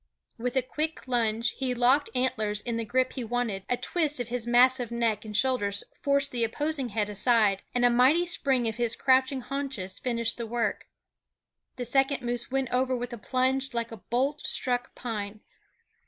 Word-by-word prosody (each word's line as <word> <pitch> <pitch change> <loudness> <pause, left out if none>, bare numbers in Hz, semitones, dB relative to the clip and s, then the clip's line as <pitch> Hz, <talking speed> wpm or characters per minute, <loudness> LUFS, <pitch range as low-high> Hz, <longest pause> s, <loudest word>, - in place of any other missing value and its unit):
With 245 +2 -2
a 260 - +2
quick 310 +3 -4
lunge 230 -2 +1
he 255 -2 -1
locked 255 +4 +3
antlers 220 -5 0
in 235 0 -3
the 230 - -1
grip 255 +3 0
he 255 - -4
wanted; 225 -5 -2
a 245 - +1
twist 305 -3 -1
of 245 -1 -4
his 240 -1 -2
massive 245 0 +4
neck 230 -3 -1
and 210 -1 -2
shoulders 205 -7 +1 0.2
forced 280 0 +1
the 240 -2 0
opposing 280 +3 -1
head 210 -1 -1
aside, 210 -1 +2
and 245 0 +3
a - - +6
mighty 265 +9 +4
spring 270 -8 +1
of 220 0 -3
his 235 -2 0
crouching 260 0 +2
haunches 265 -9 -5
finished 235 -2 -1
the 235 -1 -4
work. 235 +1 -2 0.9
The 245 - -3
second 270 +2 +2
moose 240 0 -2
went 265 -1 -1
over 255 +1 +1
with 245 0 -5
a - - -5
plunge 260 +2 0
like 230 0 -2
a 225 - -7
bolt 270 +7 -1
struck 245 -1 0
pine. 215 -3 -5
245 Hz, 185 wpm, -27 LUFS, 230-260 Hz, 0.9 s, a